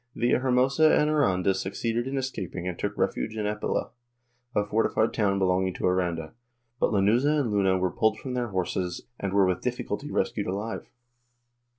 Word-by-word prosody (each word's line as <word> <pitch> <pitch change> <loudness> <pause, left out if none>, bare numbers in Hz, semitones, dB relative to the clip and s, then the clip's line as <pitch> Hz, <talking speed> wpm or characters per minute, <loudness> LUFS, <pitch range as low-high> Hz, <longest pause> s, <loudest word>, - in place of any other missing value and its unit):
Villahermosa 130 +5 +3
and 150 0 +2
Aranda 95 -11 +2
succeeded 115 +5 -2
in 135 +1 -2
escaping 95 -9 -4
and 90 - -4
took - - -3
refuge 110 - -1
in 105 - -1
Epila, 105 0 -2 0.6
a 105 - +2
fortified 110 +1 +1
town 100 -3 +1
belonging 95 -1 +1
to - - -3
Aranda, 85 -3 0 0.5
but - - +2
Lanuza 120 +9 +3
and 125 -6 0
Luna 95 -2 +3
were 90 -1 0
pulled 110 -1 +1
from 130 +3 -6
their 125 -1 -1
horses 90 -2 -2 0.2
and 100 - -2
were 100 0 +4
with 90 -1 0
difficulty - - -3
rescued - - -1
alive. 100 +5 -4
105 Hz, 165 wpm, -27 LUFS, 95-120 Hz, 0.6 s, were